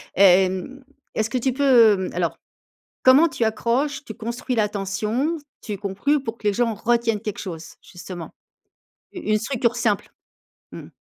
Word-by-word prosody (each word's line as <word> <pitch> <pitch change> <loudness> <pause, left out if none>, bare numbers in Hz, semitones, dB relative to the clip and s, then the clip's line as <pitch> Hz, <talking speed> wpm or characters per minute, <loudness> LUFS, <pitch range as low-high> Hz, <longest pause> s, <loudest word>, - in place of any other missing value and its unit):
Hem, 190 +7 +3 0.3
est-ce 220 0 0
que 255 - 0
tu 260 +1 0
peux, 245 -6 +5
mmh 190 - -3
alors - - -1 0.7
comment 275 +6 +6
tu 260 -5 -2
accroches, 240 +6 -1
tu 220 - -7
construis 235 +4 -4
l'attention, 210 - -1 0.2
tu 210 -3 -5
conclues 205 +9 -1
pour 230 -3 -5
que 210 - -1
les 205 - +1
gens 235 +1 +1
retiennent 230 0 0
quelque 210 -2 -5
chose 170 -4 -7
justement? 175 -1 -9 0.8
Une 215 - 0
structure 235 0 -1
simple. 220 -4 0 0.6
Mmh. - - -9
225 Hz, 145 wpm, -23 LUFS, 200-255 Hz, 0.8 s, comment